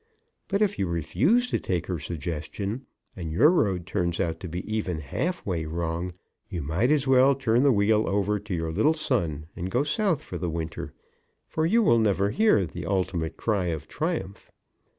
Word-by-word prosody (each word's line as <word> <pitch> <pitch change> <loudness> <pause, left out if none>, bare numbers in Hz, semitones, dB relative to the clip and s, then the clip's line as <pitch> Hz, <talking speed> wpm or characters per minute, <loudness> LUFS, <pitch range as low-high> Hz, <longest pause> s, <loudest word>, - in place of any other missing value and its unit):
But 200 +2 +2
if 205 -1 0
you 95 - +1
refuse 185 - +2
to - - +1
take 90 -3 -2
her 90 -3 -3
suggestion, 85 - -4 0.3
and 85 -4 -5
your 135 - +5
road 95 - +1
turns 85 -1 -1
out 80 -1 -1
to 95 - -6
be 90 +2 -5
even 110 -6 -2
halfway 85 - -2
wrong, 85 +2 -3 0.4
you 90 -6 -4
might 85 - +1
as 150 -2 +3
well 135 +1 +5
turn 125 -3 +2
the 140 0 +5
wheel 110 0 +3
over 100 +1 +1
to 100 -2 -4
your 80 -1 -2
little 130 - +3
son 85 - -1
and 90 0 -4
go 125 +8 +1
South 170 0 0
for 90 - -6
the 85 0 -2
winter, 80 0 -4 0.5
for 160 0 0
you 230 +6 +4
will 115 - +5
never 100 -2 +2
hear 115 - +3
the 80 - -7
ultimate 90 -4 -1
cry 105 -5 0
of 80 -2 -3
triumph. 155 - -3
95 Hz, 185 wpm, -26 LUFS, 85-130 Hz, 0.5 s, your